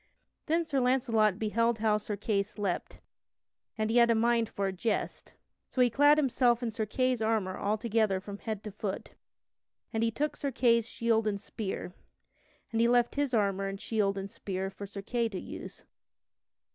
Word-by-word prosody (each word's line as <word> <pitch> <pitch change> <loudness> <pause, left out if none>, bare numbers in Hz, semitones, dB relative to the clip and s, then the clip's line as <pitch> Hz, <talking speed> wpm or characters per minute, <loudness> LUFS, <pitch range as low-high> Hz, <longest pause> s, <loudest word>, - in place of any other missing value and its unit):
Then 330 +1 +2
Sir 280 -4 0
Launcelot 240 -6 +2
beheld 230 +2 +1
how 215 -1 +2
Sir 210 0 -4
Kay 205 0 +1
slept, 200 -2 -4 0.8
and 215 0 0
he 235 - +3
had 235 -1 +6
a 230 - +4
mind 230 0 +2
for 200 - -2
a 195 - 0
jest. 210 +4 -3 0.4
So - - -5
he 245 -1 +5
clad 290 +4 +5
himself 250 -4 +2
in 230 - -1
Sir 220 -1 -3
Kay's 255 +1 0
armor 220 -4 0
altogether 215 -1 +1
from 200 +1 -8
head 215 -3 -4
to 210 - -6
foot, 200 -1 -5 0.8
and 225 - 0
he 230 - +3
took 295 +7 -2
Sir 280 - -2
Kay's 235 -2 +3
shield 225 -1 +1
and 200 -1 -1
spear, 195 -3 -5 0.8
and 225 0 +1
he 235 - +5
left 240 0 +3
his 285 -3 0
armor 195 -2 +1
and 195 0 -5
shield 200 -3 0
and 195 0 -5
spear 190 0 -4
for 200 +1 -8
Sir 200 0 -8
Kay 235 +1 0
to 190 -4 -5
use. - - -9
220 Hz, 185 wpm, -30 LUFS, 200-240 Hz, 0.8 s, had